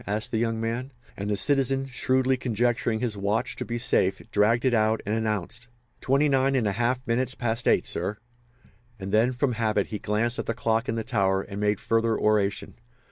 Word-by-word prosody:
asked 105 Hz, +2 st, -2 dB
the 110 Hz, -, 0 dB
young 115 Hz, -1 st, -1 dB
man; 115 Hz, +4 st, -3 dB, 0.2 s
and 100 Hz, +1 st, -4 dB
the 105 Hz, -, 0 dB
citizen, 135 Hz, +5 st, +2 dB
shrewdly 130 Hz, 0 st, +1 dB
conjecturing 120 Hz, -2 st, 0 dB
his 120 Hz, -4 st, 0 dB
watch 110 Hz, +4 st, -1 dB
to -, -, -4 dB
be 120 Hz, -, -4 dB
safe, 100 Hz, -5 st, +1 dB
dragged 115 Hz, +4 st, +2 dB
it 130 Hz, -, +3 dB
out 110 Hz, 0 st, +2 dB
and 105 Hz, -, -1 dB
announced: 110 Hz, +1 st, -2 dB, 0.3 s
"Twenty 140 Hz, +3 st, +2 dB
nine 135 Hz, -1 st, +2 dB
and 125 Hz, -4 st, +1 dB
a 100 Hz, -, +1 dB
half 120 Hz, +5 st, -1 dB
minutes 125 Hz, +2 st, 0 dB
past 120 Hz, 0 st, -2 dB
eight, -, -, +3 dB
sir." 105 Hz, -, -1 dB, 0.8 s
And 95 Hz, 0 st, -5 dB
then, 110 Hz, +4 st, +3 dB
from 125 Hz, +1 st, 0 dB
habit, 110 Hz, -3 st, 0 dB
he 105 Hz, -, -4 dB
glanced 110 Hz, +3 st, 0 dB
at -, -, -4 dB
the 115 Hz, -, -1 dB
clock 115 Hz, +1 st, 0 dB
in 110 Hz, -, -1 dB
the 115 Hz, -, -2 dB
tower, 100 Hz, -5 st, +1 dB
and 100 Hz, 0 st, -7 dB
made 105 Hz, -1 st, +1 dB
further 115 Hz, 0 st, +1 dB
oration. 105 Hz, -1 st, 0 dB
115 Hz, 200 wpm, -26 LUFS, 105-125 Hz, 0.8 s, it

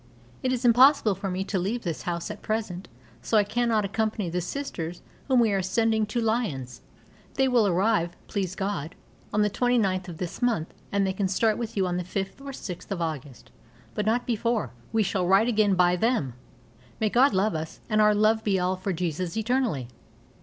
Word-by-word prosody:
It 255 Hz, -, 0 dB
is 255 Hz, 0 st, -1 dB
impossible 245 Hz, -2 st, +6 dB
for 195 Hz, +1 st, -4 dB
me 185 Hz, +1 st, -2 dB
to 195 Hz, -1 st, -2 dB
leave 215 Hz, +7 st, -2 dB
this 170 Hz, -4 st, -3 dB
house 170 Hz, -1 st, -3 dB
at -, -, -9 dB
present, 215 Hz, -5 st, -3 dB, 0.3 s
so 220 Hz, -, +1 dB
I 210 Hz, -, +5 dB
cannot 220 Hz, 0 st, +1 dB
accompany 215 Hz, -3 st, -1 dB
the 180 Hz, +1 st, -1 dB
Sisters 175 Hz, -, -5 dB, 0.2 s
whom 260 Hz, -2 st, +4 dB
we 225 Hz, -3 st, +4 dB
are 195 Hz, -1 st, +1 dB
sending 220 Hz, +3 st, +1 dB
to 225 Hz, +3 st, -2 dB
Lyons. 190 Hz, -, -2 dB, 0.5 s
They 265 Hz, -, +3 dB
will 240 Hz, -5 st, +3 dB
arrive, 180 Hz, -2 st, +1 dB
please 185 Hz, -2 st, -3 dB
God, 190 Hz, -5 st, -3 dB, 0.4 s
on 210 Hz, -, +2 dB
the 210 Hz, -, +2 dB
29th 200 Hz, -7 st, +1 dB
of 170 Hz, -3 st, -7 dB
this 175 Hz, +5 st, -5 dB
month, 230 Hz, -10 st, 0 dB, 0.2 s
and 200 Hz, -1 st, +2 dB
they 190 Hz, -, 0 dB
can 190 Hz, 0 st, 0 dB
start 215 Hz, +3 st, +2 dB
with 230 Hz, -2 st, -5 dB
you 190 Hz, -, +2 dB
on 180 Hz, -1 st, -1 dB
the 180 Hz, -, -2 dB
5th 195 Hz, +6 st, -4 dB
or 280 Hz, -, -7 dB
6th 185 Hz, -9 st, -7 dB
of 195 Hz, -3 st, -3 dB
August, 150 Hz, -6 st, -5 dB, 0.4 s
but 210 Hz, -, -2 dB
not 240 Hz, +3 st, +1 dB
before. 230 Hz, -, -1 dB, 0.2 s
We 220 Hz, -1 st, +2 dB
shall 185 Hz, -2 st, -1 dB
write 195 Hz, +5 st, +5 dB
again 215 Hz, -4 st, +3 dB
by 180 Hz, 0 st, +4 dB
them. 200 Hz, -, 0 dB, 0.7 s
May 215 Hz, -2 st, +1 dB
God 250 Hz, -3 st, +4 dB
love 205 Hz, +3 st, +2 dB
us, 160 Hz, 0 st, -5 dB
and 215 Hz, -1 st, +2 dB
our 210 Hz, 0 st, +5 dB
love 215 Hz, +1 st, +3 dB
be 200 Hz, -2 st, +2 dB
all 180 Hz, +1 st, 0 dB
for 185 Hz, +1 st, -3 dB
Jesus 175 Hz, +2 st, -3 dB
eternally. 225 Hz, -, 0 dB
205 Hz, 200 wpm, -26 LUFS, 180-225 Hz, 0.7 s, impossible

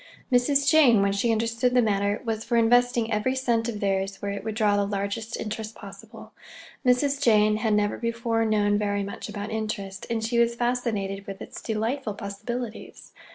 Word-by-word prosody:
Mrs. 275 Hz, +3 st, +3 dB
Jane, 275 Hz, -9 st, +6 dB
when 200 Hz, -, +2 dB
she 215 Hz, +4 st, +1 dB
understood 230 Hz, +3 st, 0 dB
the 250 Hz, -, +6 dB
matter, 205 Hz, -1 st, 0 dB
was 225 Hz, -1 st, -2 dB
for 235 Hz, -1 st, 0 dB
investing 240 Hz, 0 st, +3 dB
every 210 Hz, +5 st, 0 dB
cent 235 Hz, -3 st, 0 dB
of 215 Hz, -3 st, -5 dB
theirs 195 Hz, 0 st, -1 dB
where 200 Hz, -, -3 dB
it 200 Hz, -, -5 dB
would 220 Hz, -1 st, -4 dB
draw 210 Hz, -2 st, +2 dB
the 205 Hz, -, +2 dB
largest 200 Hz, +3 st, -3 dB
interest 220 Hz, 0 st, -5 dB
possible. -, -, -12 dB, 0.5 s
Mrs. 275 Hz, +2 st, +2 dB
Jane 215 Hz, -4 st, +4 dB
had 220 Hz, -1 st, +1 dB
never 205 Hz, 0 st, 0 dB
before 230 Hz, -1 st, -1 dB
known 205 Hz, -2 st, +2 dB
very 205 Hz, -1 st, -1 dB
much 200 Hz, +2 st, -7 dB
about 205 Hz, 0 st, -5 dB
interest, 215 Hz, -3 st, -4 dB
and 225 Hz, -1 st, -1 dB
she 235 Hz, +1 st, 0 dB
was 235 Hz, 0 st, +3 dB
fascinated 225 Hz, -5 st, -2 dB
with 195 Hz, -1 st, -7 dB
its -, -, -9 dB
delightful 225 Hz, +1 st, -2 dB
possibilities. 220 Hz, +3 st, -6 dB
220 Hz, 180 wpm, -25 LUFS, 205-240 Hz, 0.5 s, Jane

